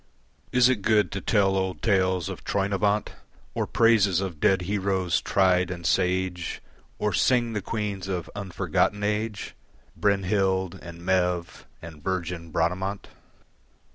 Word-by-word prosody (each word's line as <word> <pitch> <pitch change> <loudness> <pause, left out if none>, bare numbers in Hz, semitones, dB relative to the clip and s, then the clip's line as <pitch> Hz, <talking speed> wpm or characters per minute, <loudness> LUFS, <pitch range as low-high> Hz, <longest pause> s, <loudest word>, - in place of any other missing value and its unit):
Is 125 -1 +5
it 130 -5 +1
good 105 0 +2
to 100 - -4
tell 100 -3 +2
old 95 -1 -2
tales 95 -5 +2
of - - -7
Troynovant 100 +1 0 0.4
Or - - -2
praises 105 -6 +4
of 95 -5 -4
dead 95 +1 +3
heroes, 95 -2 0
tried 90 -2 +2
and 85 -2 -6
sage, 90 0 0 0.4
Or 105 -2 -1
sing 120 0 +2
the 105 - -2
queens 100 -2 -3
of 90 -3 -3
unforgotten 100 +1 -1
age, 105 0 -2 0.4
Brynhild 95 -2 +1
and 85 0 -10
Maeve 90 -2 0 0.2
and 80 -3 -10
virgin 90 -2 -3
Bradamant? 90 +5 -2
95 Hz, 130 wpm, -26 LUFS, 90-105 Hz, 0.4 s, Is